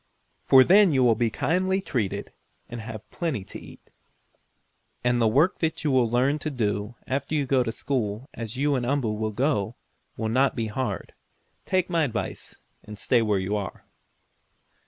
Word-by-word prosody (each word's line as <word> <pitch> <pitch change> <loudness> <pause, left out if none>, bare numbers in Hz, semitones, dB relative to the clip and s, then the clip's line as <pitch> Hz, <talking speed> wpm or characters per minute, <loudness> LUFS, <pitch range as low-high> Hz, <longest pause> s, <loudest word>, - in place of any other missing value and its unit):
For 130 -1 +8
then 195 +4 +6
you 130 -3 +3
will 120 -2 +5
be 115 +1 +1
kindly 180 - 0
treated, 120 - -3 0.4
and 120 -1 -7
have 110 -1 -8
plenty 155 - -2
to 100 - -10
eat. - - -15 1.1
And 120 0 +2
the 115 - +4
work 145 +11 +2
you 160 -2 0
will 125 -3 +3
learn 130 +5 +2
to 155 - -3
do, 105 -4 -2
after 140 +3 -2
you 145 -2 +1
go 130 -1 +2
to 120 -2 -1
school, 115 -2 -2
as 115 +1 -5
you 145 +2 +2
and 130 -3 0
Umboo 125 -3 0
will 110 +1 -2
go, 115 -1 0 0.4
will 110 - -2
not 130 +4 +2
be 115 - -1
hard. 130 +4 -3 0.5
Take 185 -1 +1
my 170 -3 +1
advice 110 -8 -5 0.2
and 105 0 -10
stay 120 +3 +2
where 105 -3 +1
you 95 +2 -1
are." 100 -3 -5
125 Hz, 175 wpm, -25 LUFS, 110-145 Hz, 1.1 s, For